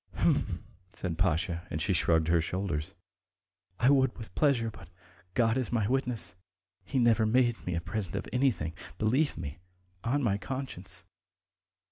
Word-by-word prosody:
"H'm!" - - +1 0.3
said 90 -5 -4
Pasha, 85 -1 +1
and 80 - -2
she 95 +5 +1
shrugged 80 -2 +3
her 85 -1 +4
shoulders. 90 0 -2 0.8
"I 125 +4 +5
would 130 -2 +3
with 110 - -9
pleasure, 125 -7 +2
but 95 -5 -13 0.5
God 115 -1 +3
is 130 -3 -1
my 110 -4 +2
witness, 125 -2 0 0.5
he 140 - -3
never 120 -2 +5
made 120 0 +2
me 90 - 0
a 85 - -1
present 90 +1 -3
of - - -3
anything. 125 - +1 0.2
Believe 130 - +2
me, 75 -1 -6 0.4
on 140 +4 +1
my 100 -4 +2
conscience. 130 -6 -5
110 Hz, 150 wpm, -30 LUFS, 85-125 Hz, 0.8 s, I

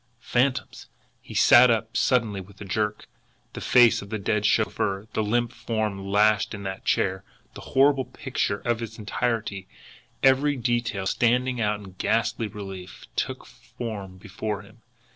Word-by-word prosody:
Phantoms! 125 +2 0 0.3
He - - -11
sat 125 +1 +7
up 115 -1 0
suddenly 115 -6 +1
with 100 +1 -15
a 100 - -7
jerk. 105 +2 -2 0.5
The - - -7
face 120 -2 +5
of 100 - -10
the 110 - -2
dead 105 +1 0
chauffeur, 100 +2 0
the - - 0
limp 120 +3 0
form 105 -4 -3
lashed 105 +1 +3
in 100 - -8
that 95 0 -6
chair, 95 0 +1 0.3
the - - -10
horrible 135 0 +3
picture 125 -5 -3
in 120 -1 0
its 115 0 -7
entirety, 110 -3 -2 0.6
every 135 +2 +4
detail 120 -5 -1
standing 125 +4 +1
out 105 -1 0
in 95 -2 -12
ghastly 115 0 0
relief, 95 -3 -9
took - - -3
form 100 -6 -8
before 105 +1 -5
him. 115 +3 -19
110 Hz, 150 wpm, -25 LUFS, 100-120 Hz, 0.6 s, sat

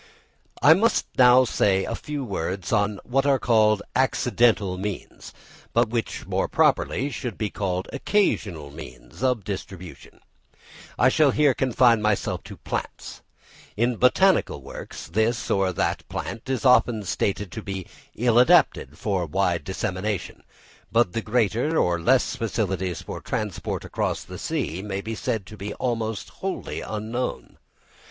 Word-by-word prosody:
I 145 +4 +9
must 220 +7 +2
now 125 0 +7
say 95 -5 +2
a - - -3
few 145 -3 -5
words 95 -1 -3
on 105 -1 +1
what 135 +3 0
are 140 -1 +4
called 110 -4 +3
accidental 120 -6 +2
means, 100 +1 -6 0.4
but 120 -1 +3
which 115 0 -3
more - - -1
properly 140 +5 +1
should 125 -4 -5
be 105 -2 -2
called 95 -2 -2
occasional 100 - 0
means - - -12
of 125 -5 +1
distribution. 95 -2 -8 0.8
I 125 - +5
shall 150 +2 +4
here 145 0 +3
confine 125 -3 +3
myself 105 -1 0
to - - -10
plants. - - -6 0.6
In 120 +1 +1
botanical 125 - +3
works, - - -8
this 110 +6 0
or 95 -1 +2
that 85 - -2
plant 115 +3 -6
is 130 -2 -1
often 120 -4 +4
stated 100 0 -2
to 110 - -6
be 95 -3 -5 0.3
ill 120 0 +3
adapted 75 - +4
for 95 -5 -1
wide 90 +1 0
dissemination; 95 +1 -3 0.5
but 115 -6 +2
the 115 - -1
greater 120 +7 +1
or 85 -1 +2
less 130 +9 +3
facilities 95 -5 -2
for - - -7
transport 105 -4 -3
across - - -2
the - - -9
sea 85 +4 -2
may 100 -1 -4
be 110 +2 -5
said 110 -2 -2
to 105 - -11
be 105 +2 -6
almost 115 -4 -2
wholly 195 0 -4
unknown. 110 +4 -4
110 Hz, 145 wpm, -24 LUFS, 95-125 Hz, 0.8 s, I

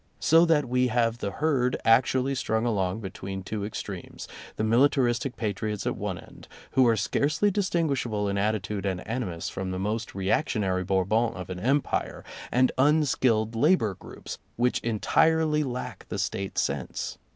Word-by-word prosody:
So 165 +2 +5
that 150 -5 +2
we 125 +1 +2
have 115 -1 +1
the 100 - -2
herd 130 +1 0
actually 130 +3 +3
strung 110 -3 -1
along 100 -3 0
between 95 -1 -6
two 105 +1 -4
extremes, 100 -3 -6 0.3
the - - -2
militaristic 120 +1 +2
patriots 105 -1 -3
at - - -1
one - - -3
end, - - -14 0.2
who 130 -2 +4
are 115 -1 +3
scarcely 150 - +1
distinguishable 145 - 0
in 100 - -1
attitude 100 -1 -1
and 90 -1 -3
animus 105 -8 -3
from 95 -1 -4
the 95 - -3
most 105 +3 -3
reactionary 95 -2 0
Bourbons 100 +5 +1
of 90 0 -7
an 90 - -5
Empire, 135 +7 0 0.3
and 130 +1 +3
un 150 +3 +4
skilled 115 -4 +1
labor 140 - +3
groups, - - -9 0.2
which 125 +1 +1
entirely 150 +7 +2
lack 125 -3 -5
the - - -3
State 95 0 -3
sense. - - -2
115 Hz, 155 wpm, -27 LUFS, 100-130 Hz, 0.3 s, So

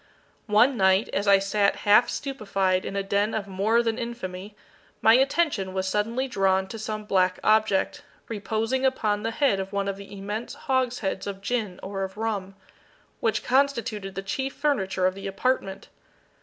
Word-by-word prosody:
One 230 +5 +4
night, 190 +2 +3
as 200 +1 -1
I 200 0 +7
sat 200 +1 +1
half 210 +4 +6
stupefied 195 -8 -1
in - - -5
a 200 - 0
den 200 +2 0
of 205 -2 -3
more 210 +5 +2
than 225 0 -1
infamy, 205 -4 -6 0.4
my 225 - +6
attention 265 - +2
was 190 0 -1
suddenly 225 +7 0
drawn 195 -5 +1
to 225 - -7
some 215 0 -4
black 185 -2 +2
object, 215 -2 +2 0.3
reposing 225 +4 -2
upon 215 -6 +1
the 225 - -1
head 230 -4 +1
of 190 0 -4
one 200 -1 -1
of 195 -1 -2
the 200 0 -11
immense 205 +4 -5
hogsheads 250 -8 -1
of 195 -1 -5
gin 210 -3 -2
or 195 0 -4
of 190 +1 -6
rum, 205 -4 -3 0.6
which 225 - 0
constituted 235 -7 0
the 195 - -4
chief 265 +8 -3
furniture 195 -11 0
of 185 - +2
the 195 +1 -7
apartment. 195 -1 -1
210 Hz, 170 wpm, -25 LUFS, 195-235 Hz, 0.6 s, I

